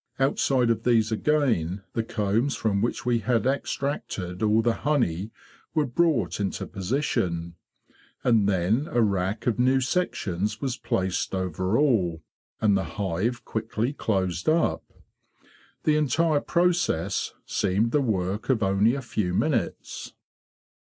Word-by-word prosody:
Outside 135 -2 +2
of 110 -1 0
these 115 -2 +2
again 110 - +1
the 115 - 0
combs 110 +5 0
from 100 -3 0
which 120 - -2
we 120 -1 +2
had 115 +1 0
extracted 130 -9 -2
all 110 +1 +3
the 120 0 +3
honey 110 - 0 0.5
were 155 -2 +3
brought 120 - +1
into 100 -2 -2
position. 90 - -2 0.7
And 110 -5 +3
then 100 - +1
a 120 -1 +2
rack 100 +1 -1
of 120 -1 0
new 130 +2 +4
sections 105 - -1
was 135 -3 -2
placed 95 -4 -1
over 95 +3 -1
all, 95 - +2 0.4
and 105 -2 +3
the 95 - +1
hive 105 +5 -1
quickly 110 +3 -2
closed 95 - -1
up. 165 +1 +2 1.0
The 150 -1 +3
entire 155 +1 +2
process 175 - 0
seemed 105 +4 0
the 145 - +3
work 105 -1 -1
of 120 -5 +2
only 100 +5 +3
a 140 - -4
few 95 -6 -2
minutes. 130 +2 -2
110 Hz, 130 wpm, -26 LUFS, 95-130 Hz, 1.0 s, new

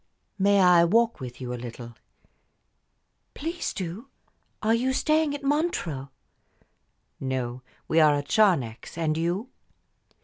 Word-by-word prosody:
"May 200 +1 +4
I 180 -2 +6
walk 230 +7 +2
with 125 -2 -8
you 125 -1 -5
a 120 - -6
little?" 120 0 -8 1.4
"Please 330 +4 -3
do. 190 +8 -6 0.5
Are 220 +1 +3
you 255 +3 +1
staying 305 +1 +1
at 285 - -8
Montreux?" 275 - -1 1.1
"No; 130 -2 -3 0.3
we 160 - +3
are 150 -2 +6
at 145 0 -3
Charnex 165 - +1
and 160 -2 0
you?" 175 +9 -2
175 Hz, 125 wpm, -26 LUFS, -, 1.4 s, I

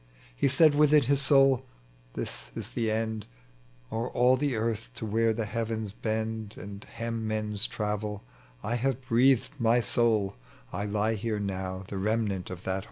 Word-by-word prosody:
He - - +2
said 155 +3 +6
within 150 0 +5
his 140 +2 +2
soul, 135 -2 +5 0.3
" - - -30
This - - -5
is - - -5
the 115 -2 -1
end: 110 -1 -2 0.6
O'er 115 +2 -2
all 125 +1 +4
the 140 -1 0
earth 115 0 -2
to 115 - -4
where 115 +2 +2
tbe 110 0 -2
heavens 110 -1 -2
bend 110 0 -3
And 100 0 -8
hem 115 -1 -4
men's 105 0 0
travel, 105 -1 -3 0.4
I 110 - -1
have 130 +1 0
breathed 130 +3 +3
my 115 +1 +4
soul: 110 -3 +1 0.4
I 100 - -2
lie 105 +2 +1
here 110 0 -2
now 95 -1 -3
the 100 - -4
remnant 105 -2 -1
of 90 -1 -7
that - - -2
whole. 95 - 0
110 Hz, 170 wpm, -29 LUFS, 105-120 Hz, 0.6 s, said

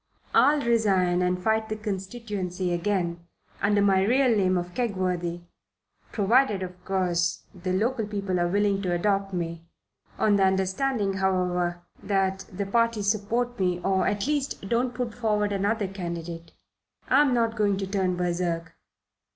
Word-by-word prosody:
I'll 295 0 +5
resign 195 -7 +2
and 180 0 +1
fight 220 +3 0
the 215 - -2
constituency 195 -3 -3
again, 175 -2 -1 0.3
under 205 0 +3
my 195 -2 +4
real 250 +2 +3
name 185 -3 +2
of 175 0 -4
Kegworthy, 180 -7 -1 0.7
provided, 210 -1 +2
of 180 0 -9
course, 180 -2 0
the 185 0 -4
local 220 +4 0
people 200 -3 -2
are 175 - +2
willing 200 +1 +1
to 180 -3 -1
adopt 195 +2 0
me 170 -2 -4 0.5
on 205 -1 +3
the 195 - +3
understanding, 190 +3 +1
however, 180 -2 0 0.2
that 195 -1 0
the 200 +2 -3
party 230 +1 +1
support 225 +4 -1
me, 180 -2 +1
or, 190 0 +1
at 205 -1 0
least, 285 -8 -2
don't 240 +3 0
put 245 -3 -3
forward 210 -3 0
another 200 +1 0
candidate. 170 -3 -6 0.6
I'm 280 +1 +4
not 230 -1 +1
going 205 -3 +1
to 195 - -2
turn 190 -2 0
berserk." 170 -2 -2
195 Hz, 145 wpm, -26 LUFS, 180-215 Hz, 0.7 s, I'll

